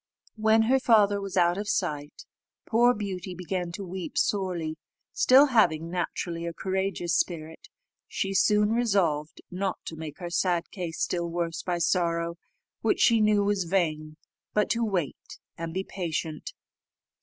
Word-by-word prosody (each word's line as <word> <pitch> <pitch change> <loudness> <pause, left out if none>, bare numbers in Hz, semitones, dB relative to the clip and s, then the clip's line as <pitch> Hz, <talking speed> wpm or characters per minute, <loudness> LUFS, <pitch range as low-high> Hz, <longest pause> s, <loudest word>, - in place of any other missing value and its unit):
When 220 0 +4
her 260 +4 +3
father 210 -5 +4
was 195 -1 -5
out 175 +1 +3
of 205 0 -4
sight, 150 -7 -2 0.4
poor 240 +2 +4
Beauty 190 -3 -5
began 180 0 -3
to 195 +2 -6
weep 185 0 -6
sorely; 175 -6 -1 0.3
still, 265 +3 +6
having 170 - +2
naturally 170 -1 -3
a 170 - -4
courageous 190 -2 -1
spirit, 160 -2 -2 0.4
she 195 0 -2
soon 210 +2 +3
resolved 190 -10 0
not 190 +1 -2
to 160 - -6
make 155 -2 -7
her 175 -2 -6
sad 175 -1 0
case 175 -5 -5
still 170 -1 -1
worse 170 -1 -2
by 180 -1 -2
sorrow, 170 0 0 0.4
which 225 - +1
she 230 -2 +5
knew 210 -1 +3
was 200 -2 0
vain, 155 -4 -1 0.4
but 210 -1 +2
to 235 0 +1
wait 185 - -3 0.2
and 165 0 -5
be 190 +3 -2
patient. 165 -5 -4
180 Hz, 150 wpm, -27 LUFS, 170-205 Hz, 0.4 s, still